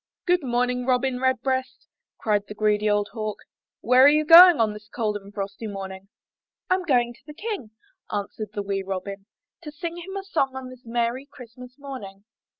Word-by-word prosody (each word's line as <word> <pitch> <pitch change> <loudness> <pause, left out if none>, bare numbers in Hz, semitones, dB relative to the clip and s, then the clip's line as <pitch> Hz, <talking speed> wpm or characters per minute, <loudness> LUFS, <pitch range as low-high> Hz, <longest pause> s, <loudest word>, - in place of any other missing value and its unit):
''Good 355 0 +3
morning, 250 -1 -1
Robin 255 0 +1
Redbreast," 260 0 -1 0.3
cried 205 -2 0
the 210 - -8
greedy 210 0 +1
old 205 0 +1
Hawk, 215 -2 -4 0.5
''where 250 +3 +6
are - - +9
you 305 +1 +3
going 340 0 +10
on 220 -2 +2
this 210 0 -12
cold 215 -3 -2
and 200 -1 -8
frosty 200 +2 -5
morning?" 195 -1 -7 0.6
'Tm 370 -1 +1
going 240 -4 +2
to - - -23
the 300 - -10
King," 410 - -5 0.4
answered 210 +1 -4
the 205 - -3
wee 195 -1 -2
Robin, 195 +1 -6 0.3
"to 305 -3 -8
sing 335 +3 -6
him 375 +3 -8
a 390 - -5
song 275 -9 -1
on 260 -1 -7
this 255 -2 -15
merry 240 +3 -1
Christmas 250 -1 -13
morning." 250 -9 -9
245 Hz, 180 wpm, -24 LUFS, 210-270 Hz, 0.6 s, going